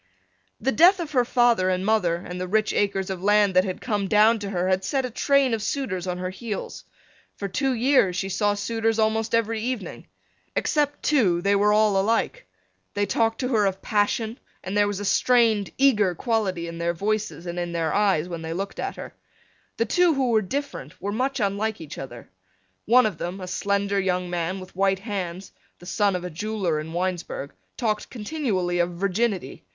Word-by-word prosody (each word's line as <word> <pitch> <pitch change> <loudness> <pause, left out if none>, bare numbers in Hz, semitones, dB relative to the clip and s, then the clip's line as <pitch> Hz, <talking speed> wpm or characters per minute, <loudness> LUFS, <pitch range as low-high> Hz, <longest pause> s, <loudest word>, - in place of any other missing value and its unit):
The 270 - 0
death 360 +6 +6
of 330 -3 -4
her 255 -4 +3
father 240 -6 +3
and 185 0 -1
mother 205 -6 +2
and 180 +1 -7
the 185 - -3
rich 215 +3 +1
acres 195 -2 0
of 185 -2 -5
land 205 0 +3
that 185 - +6
had 185 -2 -4
come 205 -5 -1
down 220 +3 +4
to 200 -1 -5
her 180 -2 -1
had 190 0 +1
set 265 +5 0
a 250 - -5
train 275 +1 +2
of 225 - -1
suitors 200 -7 -2
on 180 0 -2
her 185 0 -4
heels. 210 +1 -6 0.5
For 200 - -4
two 265 +8 0
years 240 -6 +3
she 190 +1 -2
saw 205 +2 +1
suitors 225 +2 -1
almost 220 +1 +1
every 225 -1 0
evening. 250 0 -4 0.5
Except 290 -2 0
two 190 - +2
they 200 0 +3
were 205 +1 +3
all 210 -2 +3
alike. 230 - -1 0.5
They 205 0 +1
talked 225 +3 0
to 250 - -1
her 215 -5 +3
of 190 0 -4
passion 220 +2 0 0.2
and 190 +2 -4
there 205 0 +4
was 205 -1 -3
a 205 - -4
strained 225 -1 +3
eager 215 -10 +3
quality 190 -5 -1
in 170 0 -7
their 170 0 -1
voices 210 -1 -2
and 175 0 -4
in 175 0 -3
their 165 -2 -1
eyes 195 -6 +2
when 170 -2 -6
they 160 0 -4
looked 195 +3 -5
at - - -3
her. - - -8 0.6
The 230 - +1
two 345 +7 +3
who 260 -3 +1
were 220 -1 +4
different 190 - -5
were 200 - -3
much 260 +5 -1
unlike 205 +1 -1
each 160 -2 -8
other. 120 -3 -9 0.6
One 250 +3 +5
of 205 -7 -2
them, 180 +3 -4
a 185 - -6
slender 200 +1 0
young 180 -2 -1
man 175 +2 -2
with 185 -1 -12
white 195 0 +2
hands, 190 -3 -5 0.3
the 175 - -15
son 200 +1 +1
of 180 - -3
a 180 - -5
jeweler 185 -2 -2
in 155 +1 -6
Winesburg, 175 -5 -3 0.2
talked 215 -3 -1
continually 210 - -2
of 175 0 +1
virginity. 195 - -1
205 Hz, 200 wpm, -24 LUFS, 180-225 Hz, 0.6 s, death